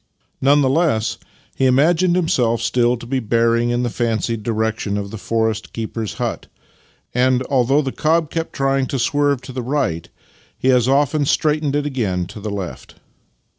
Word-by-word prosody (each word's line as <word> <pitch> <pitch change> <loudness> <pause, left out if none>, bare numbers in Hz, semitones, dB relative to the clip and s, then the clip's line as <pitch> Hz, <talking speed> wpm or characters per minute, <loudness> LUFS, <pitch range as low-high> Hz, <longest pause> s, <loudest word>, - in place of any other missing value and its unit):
None 145 +2 +4
the - - +3
less, 140 -8 +1 0.4
he 135 - +2
imagined 165 +7 +3
himself 125 -10 +1
still 120 0 +1
to 120 - -10
be 130 +2 -1
bearing 115 +1 +1
in 120 +1 0
the 120 - 0
fancied 115 -1 -1
direction 110 -2 -1
of 100 -1 -5
the 110 - -6
forest 110 0 -1
keeper's 110 -2 -4
hut, - - -3 0.7
and, 125 +1 +2
although 135 +3 +3
the 135 - -2
cob 160 +1 +1
kept 165 0 -3
trying 135 -1 0
to 140 - -2
swerve 145 +1 +1
to - - -8
the 130 0 -4
right, 115 - -2 0.5
he 130 - +2
as 125 -1 +3
often 145 +2 +2
straightened 150 0 +1
it 145 0 0
again 105 -11 -1
to 90 - -10
the 105 +1 -5
left. 100 -3 -6
125 Hz, 170 wpm, -19 LUFS, 115-140 Hz, 0.7 s, None